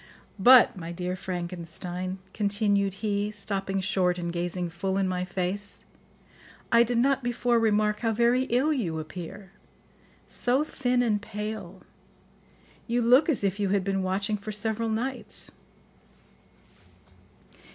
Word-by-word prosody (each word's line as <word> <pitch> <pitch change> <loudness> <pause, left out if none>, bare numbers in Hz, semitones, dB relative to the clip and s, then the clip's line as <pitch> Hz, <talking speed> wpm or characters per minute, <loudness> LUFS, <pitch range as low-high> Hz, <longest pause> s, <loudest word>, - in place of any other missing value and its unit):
But, 250 +4 +7
my 170 -2 -6
dear 180 +1 -3
Frankenstein," 180 0 -5 0.2
continued 200 -2 +1
he, 205 0 0
stopping 195 -2 -3
short 185 -2 +1
and 170 -1 -3
gazing 175 0 -3
full 190 +3 -2
in 195 -1 +1
my 180 -1 -1
face, 190 +2 -4 0.9
"I 235 - +6
did 240 0 +1
not 275 +3 +3
before 240 0 +1
remark 210 -1 +2
how 225 -2 0
very 240 +3 +3
ill 270 +5 +2
you 180 - -2
appear; 175 +4 -8 0.8
so 255 +4 0
thin 250 -5 0
and 210 -3 +1
pale; 210 -3 -6 1.0
you 240 +1 +1
look 255 +7 +5
as 275 -9 0
if 195 +1 0
you 200 -2 +1
had 195 -1 +1
been 195 0 0
watching 195 +3 -1
for 210 +1 -6
several 220 +2 -2
nights." 250 +4 -3
205 Hz, 130 wpm, -27 LUFS, 185-230 Hz, 1.0 s, But